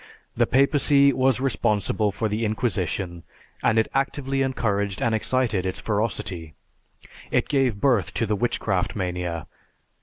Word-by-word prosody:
The - - +2
papacy 140 +1 +4
was 130 -1 +2
responsible 105 -5 +1
for 110 +3 -2
the 105 +2 -2
Inquisition, 95 -5 -2 0.4
and 110 - +2
it 110 - +3
actively 135 0 -1
encouraged 105 -7 -1
and 115 - +1
excited 110 -3 +1
its 95 -1 -3
ferocity. 100 -7 -3 0.7
It - - +1
gave 130 -7 +1
birth 120 -9 +2
to 115 - +1
the 105 0 0
Witchcraft 100 -4 -1
Mania. 90 -4 -3
110 Hz, 130 wpm, -24 LUFS, 95-130 Hz, 0.7 s, papacy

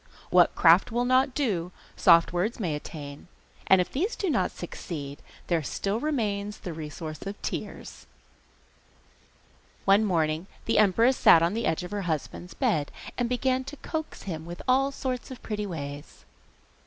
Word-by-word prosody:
What 180 -1 +5
craft 170 +4 +5
will 240 +2 0
not 255 +1 +3
do 185 - -1 0.2
soft 170 0 +5
words 205 +8 -1
may 175 -8 -1
attain, 145 0 -8 0.4
and 190 - +6
if 180 - 0
these 375 - -1
do 380 -5 -1
not 190 -9 +1
succeed 145 -5 -7 0.2
there 170 -2 +1
still 195 - -2
remains 210 -8 -2
the 180 -4 -6
resource 155 0 -7
of 200 +1 -6
tears. - - -6 1.8
One 200 +2 +5
morning 165 -3 0 0.2
the 225 - +2
empress 230 +6 +4
sat 165 - +7
on 170 +3 +1
the 230 +2 -1
edge 165 +3 0
of 180 - -7
her 205 -1 -2
husband's 165 +3 -4
bed, 150 -3 0 0.2
and 245 -1 -1
began 255 +1 +1
to 290 +2 -8
coax 315 +3 -5
him 160 -5 -5
with 175 0 -8
all 270 +2 +3
sorts 255 -2 -4
of 260 - -10
pretty 210 -1 -3
ways. 145 -5 -7
195 Hz, 160 wpm, -27 LUFS, 165-245 Hz, 1.8 s, sat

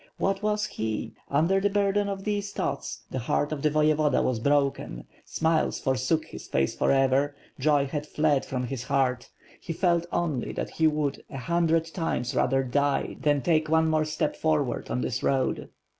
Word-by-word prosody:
What 195 0 0
was 210 0 0
he? 110 - -4 0.2
Under 165 +7 +3
the 205 +1 +2
burden 200 0 +1
of 195 -1 -4
these 205 -1 -2
thoughts, 140 -6 -3
the 130 - -2
heart 145 +5 0
of 150 -2 -3
the 150 - +3
Voyevoda 155 0 +2
was 125 -3 0
broken; 140 - 0 0.2
smiles 160 0 0
forsook 135 +4 0
his - - -10
face 65 0 0
forever; 135 +1 +2 0.2
joy 145 0 +3
had 150 +2 -4
fled 150 -3 +1
from 130 -1 -3
his 125 0 -4
heart; 130 -3 0 0.3
he 165 - -5
felt 170 -1 +1
only 155 -8 -1
that - - -4
he 160 - +2
would 150 -2 -1
a - - -7
hundred 165 +3 +1
times 140 -7 -2
rather 135 +1 +2
die 140 +2 0
than 145 -2 +2
take 155 -2 +2
one 160 0 +3
more 155 -1 +2
step 155 -1 -1
forward 150 -6 0
WITH - - -15
FIRE - - -4
AND 125 - -1
SWORD, - - 0
603 125 +3 0
on 130 - +2
this - - -6
road. - - -28
150 Hz, 195 wpm, -27 LUFS, 135-165 Hz, 0.3 s, Under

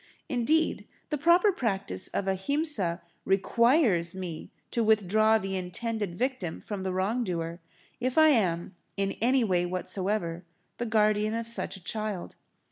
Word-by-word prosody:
Indeed, 305 +4 +1 0.2
the 300 - 0
proper 345 +6 +5
practice 195 - -2
of 195 - -3
Ahimsa 195 - 0 0.2
requires 200 - +3
me 175 -4 -6 0.2
to 235 - +1
withdraw 215 +1 +4
the 195 -2 -4
intended 190 +1 -3
victim 245 -9 -2
from 205 -2 -6
the 190 0 -2
wrong 200 +7 0
doer, 170 -3 -3 0.4
if 255 +3 -2
I 315 0 +7
am, 180 - +1 0.2
in 195 0 0
any 255 +2 +3
way 180 -5 +1
whatsoever, 185 -1 -2 0.4
the 240 - -2
guardian 215 0 +2
of 230 0 -3
such 210 -4 0
a 185 - -17
child. 215 -1 -4
210 Hz, 140 wpm, -28 LUFS, 185-235 Hz, 0.4 s, I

